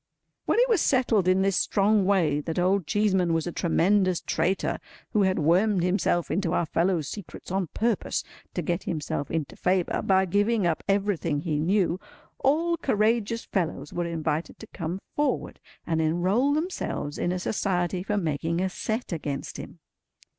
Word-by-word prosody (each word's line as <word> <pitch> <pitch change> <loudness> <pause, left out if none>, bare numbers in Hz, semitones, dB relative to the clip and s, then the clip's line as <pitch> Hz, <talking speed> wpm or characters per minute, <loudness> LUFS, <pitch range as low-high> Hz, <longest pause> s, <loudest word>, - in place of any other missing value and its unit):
When - - +1
it - - +5
was 440 -8 +3
settled 235 -8 +2
in 185 +1 +4
this 195 -1 +2
strong 205 0 +2
way 170 -7 +2
that 160 +2 -4
Old 185 -1 +2
Cheeseman 190 -5 +2
was 165 - 0
a 175 - -3
tremendous 185 +2 +2
traitor, 180 +4 -1 0.3
who 210 - +2
had 190 -1 +2
wormed 180 +5 +3
himself 180 -2 +1
into 180 -2 0
our 175 - +1
fellows' 165 -1 0
secrets 200 -2 -8
on 190 -2 0
purpose 225 +5 -1 0.3
to 175 - -1
get 170 +2 -2
himself 150 -3 -3
into 160 -4 -3
favour 180 -1 0
by 190 0 +3
giving 205 +3 +1
up 165 -2 +1
everything 195 -7 0
he 155 -3 -1
knew, 180 +1 +1 0.4
all 330 +5 +2
courageous 230 -4 +1
fellows 170 -5 -2
were 175 - -1
invited 160 -1 -2
to 220 - -11
come 170 -1 -3 0.2
forward 295 0 -1 0.3
and 160 -1 0
enrol 185 - +2
themselves 310 - -3
in 175 - 0
a 185 - -1
Society 180 -1 -1
for 205 +2 -1
making 165 -1 -1
a 190 +1 0
set 220 +5 -3
against 145 -4 -4
him. - - -9
185 Hz, 165 wpm, -26 LUFS, 165-205 Hz, 0.4 s, it